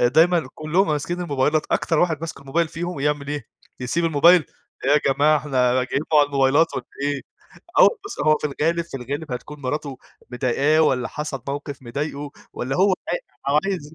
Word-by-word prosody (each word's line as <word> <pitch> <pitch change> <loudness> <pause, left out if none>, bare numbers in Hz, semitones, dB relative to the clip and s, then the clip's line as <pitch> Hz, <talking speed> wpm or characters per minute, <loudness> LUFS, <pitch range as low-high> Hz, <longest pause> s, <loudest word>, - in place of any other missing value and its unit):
دايمًا 160 +4 +4
كلّهم 165 +6 +1
ماسكين 155 +4 -2
الموبايلات 150 -1 0
أكتر 165 -3 +1
واحد 160 -4 +1
ماسك 160 -3 -6
الموبايل 155 +5 0
فيهم 175 -2 -5
يعمل 145 0 -1
إيه، 145 -1 -4 0.3
يسيب 145 +7 -1
الموبايل، 165 +1 +5 0.4
"إيه 135 - +2
يا 150 - +5
جماعة 150 +2 +4
إحنا 130 -4 +1
جايين 140 +3 -2
مع 150 - +7
الموبايلات 145 +3 +2
والّا 125 - -4 0.2
إيه!" 145 -1 -1 0.6
آه، - - +9
وبُص 410 -4 +2
هو 155 0 +5
في - - -1
الغالب 165 +4 0
في 170 - -7
الغالب 140 +3 -5
هتكون 145 +4 -7
مراته 135 0 -3 0.3
مضيقاه 135 +5 +2
والّا 125 -5 +2
حصل 150 -4 -5
موقف 140 -1 -5
مضايقه 140 +3 -4 0.2
والّا 135 +3 -3
هو 190 0 +4 0.5
ع 140 +2 +4
عايز 160 -6 -4
150 Hz, 170 wpm, -22 LUFS, 135-160 Hz, 0.6 s, آه